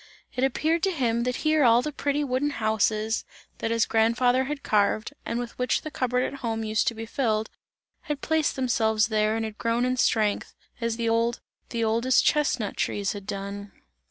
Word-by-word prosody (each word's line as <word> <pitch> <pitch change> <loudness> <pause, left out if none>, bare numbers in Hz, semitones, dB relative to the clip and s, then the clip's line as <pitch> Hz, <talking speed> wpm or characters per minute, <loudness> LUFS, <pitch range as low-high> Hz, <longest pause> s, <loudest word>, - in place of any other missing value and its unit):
It 255 - 0
appeared 315 +5 +1
to 385 - +2
him, 235 -7 0
that 250 0 0
here 310 -1 +4
all 235 0 +5
the 300 - -3
pretty 290 +1 -1
wooden 270 +1 0
houses 220 -2 0 0.4
that 225 - -1
his 230 -1 +2
grandfather 245 +3 +2
had 290 0 -5
carved, 210 +1 +1
and 230 - -2
with 240 -1 -5
which 250 -1 +1
the 310 - -6
cup 255 -3 -1
board 250 +1 +1
at 275 - -4
home 225 -3 -2
used 215 0 0
to 235 - +1
be 225 +1 -6
filled, 220 -3 -1 0.6
had 295 -2 -1
placed 320 0 0
themselves 220 -4 +1
there 215 0 +1
and 225 0 -1
had 215 -1 -8
grown 230 +1 +1
in 255 0 0
strength, 215 -4 +1 0.3
as 230 -1 0
the 230 -1 -1
old, 230 +1 +1 0.3
the 235 -1 -2
oldest 230 +3 +3
chestnut 255 -8 +1
trees 200 -1 -1
had 200 -1 -9
done. 200 0 -5
230 Hz, 195 wpm, -26 LUFS, 220-260 Hz, 0.6 s, all